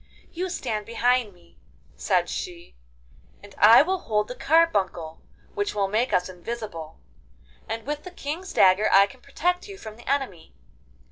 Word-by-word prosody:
'You 365 +2 -3
stand 220 - -3
behind 240 -1 +1
me,' 175 -2 -24 0.4
said 180 -3 +1
she, 175 -1 -6 0.7
'and 205 -1 -13
I 225 +6 +8
will 375 +3 -1
hold 210 -5 -1
the - - -4
carbuncle 200 - +1 0.3
which 410 - -2
will 200 -1 +1
make 220 +6 0
us 180 0 +1
invisible, 185 - -7 0.7
and 225 0 -4
with 295 +1 -4
the 365 - -8
King's 350 +2 -6
dagger 190 +3 +4
I 195 0 +7
can 255 +4 -15
protect 360 +7 -2
you 400 -1 -9
from 220 - -10
the 240 - -10
enemy. 260 - -3
225 Hz, 155 wpm, -25 LUFS, 195-295 Hz, 0.7 s, I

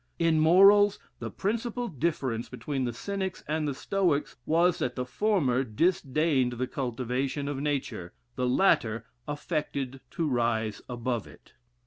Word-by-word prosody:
In 165 -2 +3
morals, 195 +5 +6 0.2
the - - -4
principal 235 +4 -2
difference 140 - -2
between 135 -3 -3
the 120 - -1
Cynics 190 - -4
and 155 0 -1
the 140 - -2
Stoics 175 -4 0
was, 170 +2 +3
that 125 - -1
the 125 - -2
former 135 - +1
disdained 140 - +1
the 125 +2 -2
cultivation 130 +1 -2
of 145 -2 -3
nature, 140 -11 -2 0.2
the 125 -1 0
latter 115 - +2 0.2
affected 145 -3 -3
to 165 +4 -2
rise 115 -4 0
above 120 -3 -2
it. - - -17
140 Hz, 135 wpm, -28 LUFS, 125-170 Hz, 0.2 s, morals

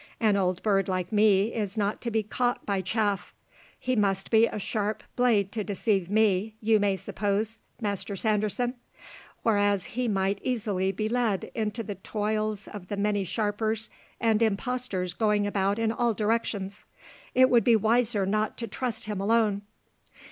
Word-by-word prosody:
An 215 -3 +3
old 185 -2 0
bird 195 -3 +2
like 185 -2 -2
me 210 0 +4
is 210 -2 -3
not 205 0 0
to 235 - -2
be 220 -1 0
caught 245 +3 -1
by 200 -2 0
chaff. 205 0 -1 0.4
He 255 0 0
must 195 -3 +1
be 225 0 +6
a - - -5
sharp 210 +1 -2
blade 220 -6 +2
to 215 -1 -2
deceive 200 -2 0
me, 215 0 +2
you 220 0 +3
may 200 -1 +2
suppose, 210 +4 -2 0.2
Master 200 -2 -3
Sanderson, 215 +4 0 0.7
whereas 205 -3 +2
he 250 +1 -1
might 195 -1 0
easily 200 -6 0
be 215 +3 -2
led 225 -4 0
in 220 -2 -1
the 210 -3 -6
toils 215 -1 -2
of 195 -4 -9
the 205 - -4
many 205 0 +1
sharpers 215 +3 -1 0.3
and 225 -1 +2
impostors 220 -4 -1
going 210 0 +1
about 200 0 0
in 225 -1 +1
all 235 -1 0
directions. 210 -3 -1 0.5
It 255 +1 +6
would 240 -2 +5
be 235 -2 +5
wiser 225 -1 +2
not 215 +2 0
to 230 - -4
trust 245 +3 -3
him 210 -2 -3
alone." 210 -1 +2
210 Hz, 160 wpm, -27 LUFS, 200-225 Hz, 0.7 s, be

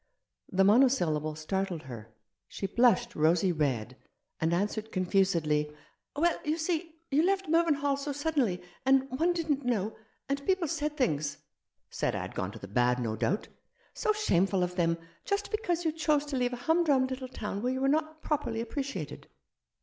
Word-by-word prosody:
The 195 +1 +4
monosyllable 190 - +3
startled 180 +1 -2
her. 115 -4 -9 0.4
She - - -5
blushed 235 +1 +3
rosy 165 +4 +3
red, 130 -6 -1 0.4
and 160 +1 +1
answered 210 +5 -1
confusedly 170 -6 +1 0.2
— - - -49
"Well, 335 +3 +2
you 310 +1 0
see, 330 0 -2 0.2
you 285 +3 +4
left 385 +1 +1
Mervynhall 295 -4 +2
so 290 +1 -3
sud 290 +3 -2
denly 200 -12 +1
— - - -29
and 270 0 +4
one 320 +7 +2
didn't 310 -5 -1
know 220 -4 -1 0.2
— - - -43
and 280 0 -2
people 370 +1 +1
said 300 +1 -2
things 155 - 0 0.3
" - - -54
"Said - - -1
I - - -2
had - - -6
gone - - -3
to - - -9
the 100 - -9
bad, 125 +4 +2
no 115 -3 -1
doubt." 200 - -1 0.4
"So 435 - +1
shameful 195 - +2
of 180 0 -2
them 165 -2 +2
— - - -32
just 400 0 -1
because 350 -6 -1
you 320 - +3
chose 305 -2 +1
to 290 -2 -4
leave 250 -1 0
a 245 0 -7
humdrum 320 -5 +3
little 260 0 -4
town 205 -5 -4
where 250 +2 0
you 260 - -3
were 270 - +2
not 310 +2 0
properly 275 -7 -1
appreciated." 235 - -4
250 Hz, 190 wpm, -30 LUFS, -, 0.4 s, The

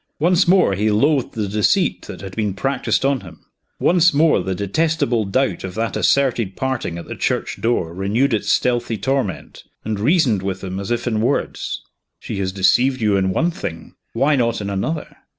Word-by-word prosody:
Once 175 +3 +3
more 180 - +4
he 105 +3 +1
loathed 135 +6 +2
the 105 -2 -2
deceit 105 0 +1
that - - -8
had 95 -2 -8
been 105 -3 -1
practiced 135 +4 0
on 135 -1 +2
him. 85 -6 -14 0.3
Once 175 -2 +4
more 155 - +4
the 95 +1 -3
detestable 120 - 0
doubt 100 -2 0
of 95 -1 -6
that 115 -1 -2
asserted 120 -8 +1
parting 130 -10 -2
at 85 - -7
the - - -6
church - - -2
door 100 -8 0
renewed 105 +8 0
its 110 - 0
stealthy 120 -2 +1
torment, 125 -3 -3 0.2
and 110 -1 -2
reasoned 125 - +2
with 95 0 -4
him 95 0 -4
as 100 - -5
if 120 -1 -1
in 110 -3 0
words: 125 +5 -2 0.4
She - - -5
has 95 -1 -1
deceived 120 +8 +2
you 105 -3 +2
in 95 -1 +1
one 165 - +1
thing; 85 - -7 0.2
why 145 +2 +2
not 115 -3 0
in 100 -1 -4
another? 150 +11 -3
115 Hz, 185 wpm, -20 LUFS, 95-135 Hz, 0.4 s, more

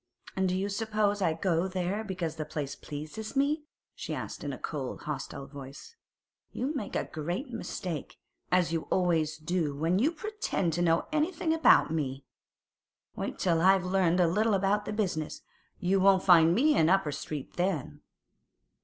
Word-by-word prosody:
'And 190 -1 +1
do 180 - 0
you 195 +1 -1
suppose 205 0 0
I 165 -4 +2
go 170 +1 +1
there 190 +3 -2
because 180 -6 -3
the 155 - -2
place 150 -2 -4
pleases 155 - -7
me?' 295 +3 +1 0.3
she - - -5
asked - - -6
in - - -3
a - - -6
cold, - - -5
hostile 135 - -5
voice. 140 - -11 0.6
'You 270 +5 -2
make 270 -9 -4
a - - +1
great 175 - -4
mistake, 185 - -5 0.3
as 180 -2 +3
you 165 - -2
always 165 -4 +1
do 155 -2 -1
when 165 +6 +1
you 285 +8 +3
pretend 380 - -2
to 175 - -1
know 165 -1 +3
anything 320 +1 0
about 320 - +5
me. 140 -4 -2 0.9
Wait - - -4
till 170 -3 +2
I've 190 0 +5
learned 180 -1 +2
a 180 - +5
little 210 +5 +2
about 200 +2 +1
the - - -3
business; 185 -8 -2 0.4
you 190 +2 +2
won't 190 0 +5
find 170 -2 +6
me 295 +5 +4
in 160 - +4
Upper 190 -5 +3
Street 145 0 -6
then. 155 -5 -2
180 Hz, 170 wpm, -29 LUFS, 160-210 Hz, 0.9 s, find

